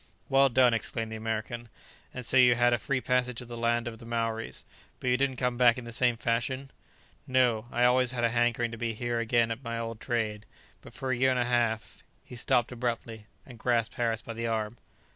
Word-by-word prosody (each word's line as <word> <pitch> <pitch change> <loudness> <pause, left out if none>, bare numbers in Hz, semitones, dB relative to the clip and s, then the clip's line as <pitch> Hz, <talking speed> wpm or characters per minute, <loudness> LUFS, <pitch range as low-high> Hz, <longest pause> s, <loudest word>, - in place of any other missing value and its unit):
"Well 135 0 +5
done!" 125 -1 +4
exclaimed 115 0 -1
the - - -4
American, 110 +2 -4 0.4
"and 125 -1 -7
so - - +1
you 125 -2 +7
had 120 0 +3
a 120 - +1
free 130 +2 -1
passage 125 -1 0
to 125 - -4
the 120 0 -8
land 120 0 0
of 115 -1 -7
the 115 - -11
Maoris. 115 -1 -3 0.3
But 125 - 0
you - - +4
didn't 135 -1 0
come 125 0 -1
back 125 0 +6
in 125 - -6
the 115 - -7
same 120 0 +2
fashion?" 130 +4 -2 0.6
"No; 125 -3 +2
I 120 - +1
always 125 0 +4
had 120 -1 -3
a 120 - +4
hankering 120 0 +1
to 115 - -8
be 115 -2 -2
here 120 +1 -2
again 115 0 +2
at 115 +4 -5
my 115 -1 -3
old 115 -1 -5
trade; 110 -4 -2 0.3
but - - -13
for 130 -1 -3
a - - +2
year 130 +2 +3
and 130 - +1
a 120 - +1
half...." 120 -2 -1 0.2
He - - -11
stopped 120 0 +1
abruptly, 115 -3 -4 0.2
and 120 -4 -13
grasped 115 -4 +1
Harris 115 -2 -1
by 115 - -6
the 115 +1 -3
arm. 110 0 -2
120 Hz, 225 wpm, -29 LUFS, 115-125 Hz, 0.6 s, you